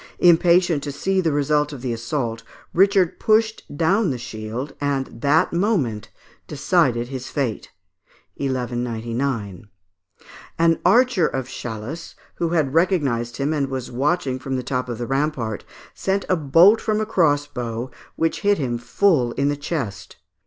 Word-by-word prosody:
Impatient 175 -2 +4
to 145 - -4
see 190 +7 0
the 165 -3 +1
result 150 +1 +1
of 135 -4 -9
the 125 -2 -1
assault, 115 -1 -3 0.3
Richard 195 -1 +3
pushed 220 0 +2 0.2
down 190 +5 +2
the 130 - -2
shield, 120 +3 -6
and 135 -4 -2
that 145 +3 +3
moment 170 - 0 0.4
decided 120 -1 +1
his 130 -2 -6
fate 130 -7 -3 0.7
(1199). 120 -5 -3 0.9
An 165 -1 +3
archer 245 -7 +4
of 130 -2 -3
Chalus, 120 +5 -7 0.2
who 170 - 0
had 155 -5 0
recognised 145 -9 +1
him 145 +3 0
and 140 -3 0
was 130 -2 -5
watching 135 +1 0
from 135 +1 -4
the 130 - -2
top 125 -1 -2
of 120 - -4
the 120 - -3
rampart, 135 -5 -2 0.3
sent 195 +1 -1
a 185 - +3
bolt 170 +8 +5
from 215 -1 0
a 215 - 0
crossbow, 145 - 0 0.2
which 165 0 -1
hit 205 0 +3
him 120 -5 -2
full 130 -3 +2
in 140 +1 0
the 145 - 0
chest. 135 - -5
140 Hz, 145 wpm, -22 LUFS, 120-170 Hz, 0.9 s, bolt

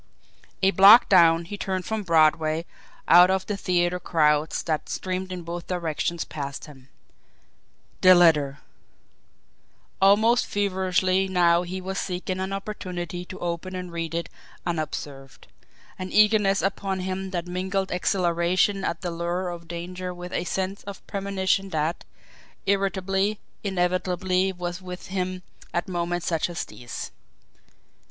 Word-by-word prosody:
A 190 - +5
block 200 +6 +8
down, 170 -3 +5
he 205 +4 -7
turned 185 -1 -2
from 220 -1 -2
Broadway 160 -2 +2 0.4
out 175 +2 +8
of 190 0 0
the 205 - -2
theatre 180 -2 0
crowds 150 -3 +1
that 155 -2 -2
streamed 185 0 -3
in 180 -1 -5
both 170 +1 -6
directions 170 -1 -2
past 140 -2 -6
him. 135 -3 -15 1.1
The 185 0 +8
letter! 150 -5 +4 1.4
Almost 220 +5 +4
feverishly 190 -1 +1
now 175 -2 +3
he 180 +1 -5
was 190 +1 -4
seeking 185 0 -3
an 190 +1 -3
opportunity 180 -3 -5
to 185 - -9
open 175 +2 -4
and 180 -1 -6
read 165 -1 -4
it 170 - -2 0.4
unobserved; 150 -5 -5 0.5
an 185 0 -5
eagerness 210 -2 +4
upon 195 -1 -1
him 190 +1 -3
that 175 -2 -3
mingled 190 +2 -2
exhilaration 180 +2 +1
at 170 - -2
the 175 - -3
lure 175 +2 -2
of 170 -1 -8
danger 180 +2 -6
with 175 0 -8
a 175 - -1
sense 190 +3 -3
of 200 -1 -9
premonition 195 -1 -1
that, 160 0 -2 0.6
irritably, 195 +1 0 0.3
inevitably 185 0 0
was 175 0 -5
with 180 0 -8
him 185 -1 -3 0.3
at 175 - -1
moments 175 -1 -2
such 165 0 0
as 175 - -4
these. 120 +3 -8
180 Hz, 135 wpm, -25 LUFS, 170-190 Hz, 1.4 s, block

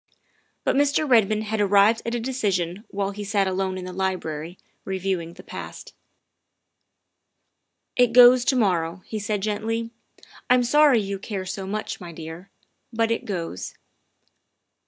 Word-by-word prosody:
But - - +1
Mr. 290 +2 +2
Redmond 215 -4 +3
had 215 0 -2
arrived 205 +3 +4
at 230 - -1
a - - -1
decision 205 -6 -2
while 200 -1 -2
he 205 +1 -7
sat 200 -1 +1
alone 190 0 -1
in 185 - -6
the 185 - -7
library, 180 -3 -3 0.3
reviewing 190 -3 -3
the - - -12
past. - - -9 1.4
" - - -53
It 245 -2 +4
goes 245 +1 +8
to 275 - +2
morrow," 180 -5 0
he 215 - -5
said 205 0 -2
gently. 225 +2 -2 0.6
"I'm 250 0 +5
sorry 285 0 +5
you 200 -1 -4
care 195 -2 -5
so 190 +1 -5
much, 215 +1 -4
my 175 -1 -8
dear, 165 +3 -9 0.4
but 230 0 0
it 230 - -1
goes. 165 - -5
200 Hz, 150 wpm, -24 LUFS, 185-230 Hz, 1.4 s, goes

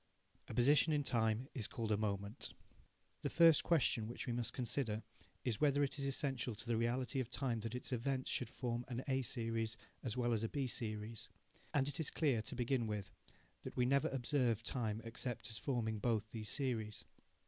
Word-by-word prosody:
A - - -6
position 145 +5 +5
in 145 -1 +2
time 115 -1 +1
is 115 -6 -2
called 115 -2 -3
a - - +5
moment. 100 +1 -2 0.7
The - - -1
first 165 -3 +7
question 130 -9 +3
which 120 - -5
we 120 - -1
must 120 -1 -1
consider 115 -3 -1 0.4
is 120 -5 0
whether 145 -1 +4
it 140 +1 -1
is 140 - -1
essential 135 -4 0
to 110 +2 -6
the 120 -1 +1
reality 125 +4 +1
of 125 -3 -2
time 125 -3 0
that 115 +2 -4
its 125 - -5
events 130 +2 0
should 125 - 0
form 120 -2 -2
an 125 0 -3
A 135 -1 +2
series 115 -2 -1 0.2
as 120 -1 -3
well 120 -1 +2
as 110 - +1
a 115 - 0
B 140 -2 -1
series. 110 -2 -3 0.4
And 140 -2 +2
it 145 +1 -4
is 160 - 0
clear, 135 -8 +2
to 110 - -6
begin 125 -1 +1
with, 105 -3 -3 0.5
that - - -7
we 125 - +4
never 140 +2 +3
observe 125 -4 +1
time 110 -3 -1
except 115 +1 -4
as 110 - -3
forming 115 -5 -1
both 110 -1 0
these 110 -2 -4
series. 115 -7 -2
120 Hz, 195 wpm, -38 LUFS, 110-135 Hz, 0.7 s, first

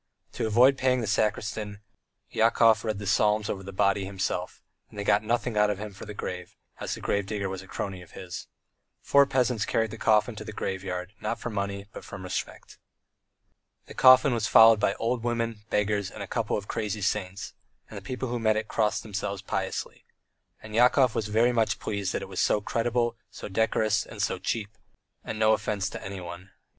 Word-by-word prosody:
To - - -2
avoid 125 +5 +5
paying 130 -1 +2
the - - -2
sacristan, 105 0 -1 0.5
Yakov 115 0 +4
read 110 -2 -2
the 100 - -6
psalms 105 +1 +2
over 95 - -5
the 95 0 -8
body 100 +1 +2
himself, 95 0 -3 0.3
and - - -14
they 100 - -2
got 100 0 +3
nothing 115 +1 -1
out 105 0 +4
of 105 - -1
him 105 0 -7
for 100 - -10
the 105 - -7
grave, 90 -3 -6 0.2
as - - -3
the - - -10
grave 100 -1 -1
digger 100 -2 -2
was 95 -1 -5
a 95 - -14
crony 95 0 -5
of 90 - -15
his. 90 -1 -7 0.6
Four 140 0 +5
peasants 125 -5 +1
carried 115 0 0
the 110 - -8
coffin 110 +2 +3
to 110 - -6
the 110 - -7
graveyard, 95 -1 -4
not 115 - -2
for 120 - -5
money, 100 -1 -3
but - - -9
from 100 -2 -9
respect. 90 0 -5 1.1
The - - -11
coffin 130 +1 +7
was 110 -3 0
followed 115 -1 +8
by - - +1
old 115 0 -1
women, 115 -3 -2
beggars, 105 -1 0
and 105 - -7
a - - -7
couple 115 +2 -1
of 100 -1 -7
crazy 105 -1 -3
saints, 95 -1 -2 0.3
and - - -11
the - - -6
people 130 0 -4
who 120 0 -2
met 110 -1 +2
it 110 0 -2
crossed 105 -1 0
themselves 100 -2 -4
piously.... - - -4 0.6
And 110 0 -10
Yakov 125 +1 +4
was 110 - -1
very 115 +3 +3
much 110 -4 +1
pleased 100 -1 -3
that - - -2
it - - -7
was - - -2
so - - +3
creditable, 120 +2 0
so - - -8
decorous, 110 0 +1
and - - -11
so - - 0
cheap, 110 -1 -3 0.5
and 110 - -5
no 110 0 +4
offence 100 -3 -1
to - - -7
anyone. 90 -1 -7
105 Hz, 200 wpm, -27 LUFS, 100-115 Hz, 1.1 s, followed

